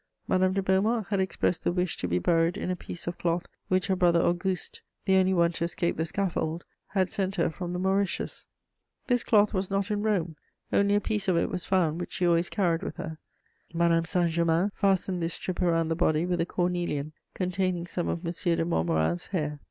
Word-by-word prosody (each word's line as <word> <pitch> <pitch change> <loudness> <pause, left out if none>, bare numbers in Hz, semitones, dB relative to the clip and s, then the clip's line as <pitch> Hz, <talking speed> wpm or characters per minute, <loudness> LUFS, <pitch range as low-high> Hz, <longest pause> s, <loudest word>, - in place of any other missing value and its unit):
Madame 185 0 +3
de 195 0 0
Beaumont 205 +4 +2
had 200 -2 +1
expressed 190 -2 0
the - - +2
wish 180 -1 -1
to - - -3
be 90 0 +1
buried 165 - +2
in 185 - -2
a - - 0
piece 175 -1 -6
of 175 0 -4
cloth 170 0 0 0.2
which 185 0 +1
her 190 -2 +1
brother 175 -2 +4
Auguste, 175 +1 -1 0.2
the 190 - +4
only 190 0 +4
one 170 -2 +3
to 170 0 -4
escape 170 0 -1
the 160 +1 -1
scaffold, 175 -3 -2 0.2
had 190 -2 0
sent 195 -1 -1
her 170 -2 +1
from 175 +2 -5
the 180 - -2
Mauritius. 190 +1 -1 0.6
This 245 -2 +2
cloth 210 -2 +4
was 190 -1 -1
not 195 +1 -1
in 205 -1 0
Rome; 180 -7 0 0.4
only 200 0 +3
a - - +4
piece 210 -2 -1
of 180 -3 +3
it - - 0
was 180 - -3
found, 175 -3 +1
which - - -6
she 180 - 0
always 170 0 +3
carried 175 -5 +1
with - - -5
her. 160 0 -6 0.6
Madame 165 0 +3
Saint 175 -1 +1
Germain 170 +4 +2
fastened 190 -2 +1
this 165 0 0
strip 185 0 -4
around 165 -2 +2
the 165 - +1
body 160 -1 +2
with 180 -1 0
a 165 - -1
cornelian 175 -5 -1 0.2
containing 185 -1 -1
some 175 0 -3
of 170 +1 -3
M. 170 - -1
de 170 -1 0
Montmorin's 80 - 0
hair. 150 -6 -2
175 Hz, 215 wpm, -28 LUFS, 165-190 Hz, 0.6 s, brother